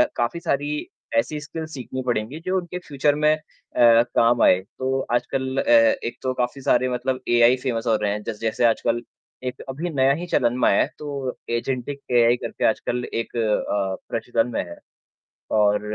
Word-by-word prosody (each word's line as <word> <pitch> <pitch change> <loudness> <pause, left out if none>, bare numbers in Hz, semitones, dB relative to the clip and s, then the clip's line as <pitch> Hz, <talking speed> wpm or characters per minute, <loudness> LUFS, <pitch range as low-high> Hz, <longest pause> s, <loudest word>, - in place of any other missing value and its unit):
काफ़ी 120 +8 -1
सारी 150 - -2 0.3
ऐसी 155 - 0
स्किल्स 160 +2 -7
सीखनी 130 0 -5
पड़ेंगी 120 +5 -2
जो 185 +1 +1
उनके 180 0 -4
फ्यूचर 145 +1 +1
में 150 +1 +3
अ, 155 - -13 0.4
काम 120 0 +5
आएँ। 90 - +5
तो 130 +6 -3
आजकल 130 +2 -1
अ, - - +2
एक 285 - +4
तो 130 - 0
काफ़ी 125 +2 -2
सारे 130 -1 +2
मतलब 130 +1 -1
एआई 120 +1 +5
फेमस 120 -3 -2
हो 110 - +4
रहे 105 - +1
हैं 105 0 -4
जैस 110 -2 -5
जैसे 115 +1 +1
आजकल 115 +1 +1 0.4
1 125 0 -5
अभी 155 +7 -3
नया 135 -3 +3
ही 170 +5 -4
चलन 125 -7 +1
में - - +4
आया - - +4
है, - - +2
तो 140 -4 -4
एजेंटिक 130 +3 -2
एआई 120 -1 +5
करके - - -3
आजकल 125 0 -2
1 115 +1 -3
अ, 105 -3 0
प्रचलन 115 0 0
में - - 0
है। 85 -1 -10 0.7
और, 105 -1 +3
125 Hz, 180 wpm, -23 LUFS, 115-145 Hz, 0.7 s, काम